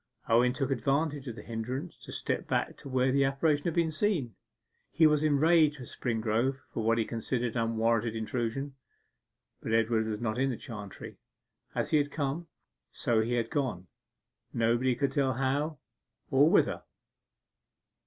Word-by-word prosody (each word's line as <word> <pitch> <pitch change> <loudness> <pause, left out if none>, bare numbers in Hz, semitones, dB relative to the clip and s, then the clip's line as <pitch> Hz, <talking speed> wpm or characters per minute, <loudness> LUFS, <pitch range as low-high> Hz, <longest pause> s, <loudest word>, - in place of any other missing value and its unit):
Owen 120 +2 +4
took 135 +1 -2
advantage 140 +3 0
of 120 - -5
the 105 - -9
hindrance 125 +8 -4
to - - -11
step - - -2
back - - 0
to 140 - -10
where 130 0 +2
the 140 +1 +3
apparition 145 +2 +1
had 170 - -1
been 165 -2 +2
seen. 155 - 0 0.6
He 160 +1 +4
was 150 -1 +4
enraged 155 0 +4
with 125 - -9
Springrove 115 +2 0 0.2
for - - -2
what 115 +1 +3
he 115 - +1
considered 115 +1 -2
an 115 - +1
unwarrantable 115 0 +1
intrusion. 120 +5 -3 0.9
But 110 - -3
Edward 115 0 +2
was 105 -1 -3
not 120 0 -2
in 135 +1 +2
the 125 - -3
chantry. 105 -6 -9 0.6
As - - -1
he 155 - +5
had 145 0 0
come, 145 +3 -2 0.4
so 115 -2 +1
he 115 +2 -1
had 115 -2 -1
gone, 130 - -1 0.7
nobody 120 +2 +2
could 140 +2 0
tell 135 -1 +1
how 140 +5 -1 0.5
or 140 +4 +5
whither. 200 - +3
130 Hz, 165 wpm, -30 LUFS, 115-145 Hz, 0.9 s, he